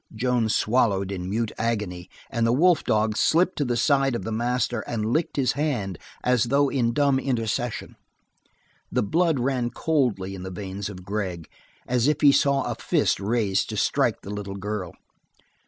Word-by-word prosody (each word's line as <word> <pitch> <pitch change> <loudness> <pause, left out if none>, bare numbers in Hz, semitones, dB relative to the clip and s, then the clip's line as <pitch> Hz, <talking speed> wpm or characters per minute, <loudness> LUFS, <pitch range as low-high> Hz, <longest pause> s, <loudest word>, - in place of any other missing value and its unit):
Joan 120 -1 +1
swallowed 105 -4 +1
in 90 -1 -4
mute 110 +2 -1
agony, 105 -6 -2 0.2
and 115 -1 +1
the - - +3
wolf 170 +6 +4
dog 110 0 +1
slipped 175 +10 +3
to 145 - +1
the 120 -1 0
side 135 0 +2
of - - -4
the 110 - -4
master 120 +1 0
and 110 -3 -2
licked 155 +9 0
his 130 -4 +2
hand 120 - -2 0.2
as 125 -2 +3
though 140 +3 +2
in 120 -4 +1
dumb 140 +1 +2
intercession. 120 -2 -2 1.0
The - - +1
blood 165 - +1
ran 125 -1 0
coldly 120 -9 0
in 95 - -7
the 95 - -6
veins 95 +2 -5
of 90 -3 -10
Gregg, 95 -5 -3 0.4
as 125 +1 +1
if 150 -1 +1
he 145 -2 +7
saw 140 -1 +2
a - - -2
fist - - 0
raised 100 -1 0
to - - -4
strike - - +1
the 100 - -7
little 100 -1 -5
girl. 100 -3 -4
115 Hz, 175 wpm, -25 LUFS, 100-135 Hz, 1.0 s, he